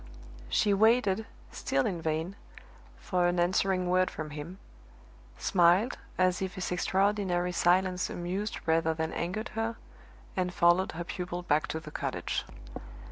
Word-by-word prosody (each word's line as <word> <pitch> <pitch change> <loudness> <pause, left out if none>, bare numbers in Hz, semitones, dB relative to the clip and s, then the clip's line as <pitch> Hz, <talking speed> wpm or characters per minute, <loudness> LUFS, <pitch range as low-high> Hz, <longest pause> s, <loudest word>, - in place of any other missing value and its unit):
She 205 - +3
waited, 220 0 +3 0.2
still 135 - 0
in 175 -4 -2
vain, 160 +4 -2 0.6
for 180 -2 +1
an 175 0 +1
answering 185 +1 +2
word 185 +1 +3
from 155 -1 -6
him 150 +5 -7 0.8
smiled, 185 +6 +3 0.2
as 185 0 +2
if 190 -1 -3
his 185 -2 -3
extraordinary 185 -1 +1
silence 180 +1 +2
amused 190 +5 -3
rather 160 0 +2
than 160 0 -2
angered 185 +7 -3
her 225 +1 -2 0.6
and 180 -1 0
followed 175 +2 +3
her 170 +2 -4
pupil 175 0 -5
back 155 -2 +1
to 160 - -3
the 155 -1 -10
cottage. - - -3
180 Hz, 135 wpm, -30 LUFS, 170-190 Hz, 0.8 s, She